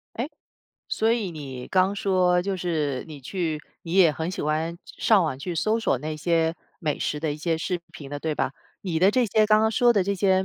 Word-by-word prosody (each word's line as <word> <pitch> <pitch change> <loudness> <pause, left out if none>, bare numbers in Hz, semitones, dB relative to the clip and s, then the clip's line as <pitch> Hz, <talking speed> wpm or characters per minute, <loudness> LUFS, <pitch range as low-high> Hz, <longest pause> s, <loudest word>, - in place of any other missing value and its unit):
哎， 240 +5 -2 0.6
所 220 +1 +1
以 220 -6 -1
你 135 -6 -7
刚 190 +1 +3
说 180 -3 +2
就 195 +1 -1
是 155 -7 -1
你 150 - -8
去 160 +2 -2 0.2
你 165 - -6
也 175 -5 +6
很 160 +3 -3
喜 185 - -4
欢 155 +3 -1
上 210 -5 +3
网 130 -4 -2
去 170 +5 -4
搜 215 +7 +1
索 180 - +1
那 155 +3 -4
些 165 +1 +1 0.3
美 150 -3 -1
食 150 - -1
的 155 -1 -1
一 145 - -5
些 165 +1 0
视 175 +2 -2
频 145 -7 -10
的， 145 - -4
对 155 -1 -1
吧？ - - -1 0.3
你 170 -5 -1
的 190 +3 +5
这 250 +1 +3
些 215 0 +3
刚 215 0 +5
刚 220 - +3
说 240 +2 +4
的 200 -5 +2
这 200 +1 0
些， 190 -1 +2
175 Hz, 240 characters per minute, -25 LUFS, 155-195 Hz, 0.6 s, 也